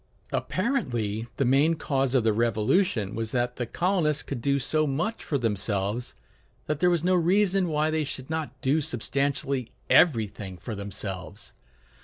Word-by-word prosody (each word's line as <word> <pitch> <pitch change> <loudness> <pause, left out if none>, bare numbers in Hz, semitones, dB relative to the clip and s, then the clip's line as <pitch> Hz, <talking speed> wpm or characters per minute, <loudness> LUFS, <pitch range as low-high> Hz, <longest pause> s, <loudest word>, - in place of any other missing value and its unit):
Apparently 120 - -1
the 135 - +1
main 140 +6 +4
cause 135 -4 0
of 125 - +4
the 110 -1 +3
Revolution 110 - +1
was 115 -1 -3
that 125 0 0
the 120 - -2
colonists 170 - +1
could 135 -4 -5
do 140 +2 +2
so 155 +3 +1
much 165 +12 -2
for 145 - -1
themselves 105 -1 -1 0.5
that 150 -1 -2
there 180 - +4
was 170 -2 +1
no 185 +1 +3
reason 185 +2 +3
why 155 -1 +1
they 155 0 +1
should 130 -2 -6
not 160 -1 -4
do 145 +3 +2
substantially 135 0 -1 0.2
everything 105 - +3
for 110 +6 -6
themselves. 100 -2 -6
135 Hz, 155 wpm, -27 LUFS, 115-160 Hz, 0.5 s, main